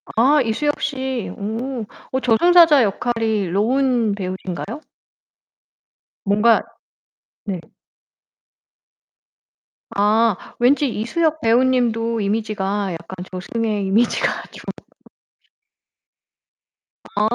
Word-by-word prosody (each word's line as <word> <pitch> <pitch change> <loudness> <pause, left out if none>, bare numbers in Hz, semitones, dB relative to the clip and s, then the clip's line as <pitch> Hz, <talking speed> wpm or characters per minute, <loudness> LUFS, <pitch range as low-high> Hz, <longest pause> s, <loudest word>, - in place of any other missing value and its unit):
아 275 +6 +4
이수혁 290 +6 -1
씨. 265 -4 -3
오 225 +4 -4 0.3
어 260 - 0
저승사자 300 +4 +5
역할이 220 -1 -1
로운 235 +3 +1
배우신가요? 190 - -5 1.4
뭔가 210 +3 +4 0.8
네. 195 -3 -3 2.4
아 210 +1 +3 0.2
왠지 275 +4 +3
이수혁 305 +8 -1
배우님도 230 -1 +2
이미지가 205 -1 -1
약간 175 +2 -8
저승의 205 +2 -2
이미지가 220 +5 +2 0.2
좀 - - -12 2.4
아 205 - -4
225 Hz, 170 characters per minute, -20 LUFS, 205-260 Hz, 2.4 s, 저승사자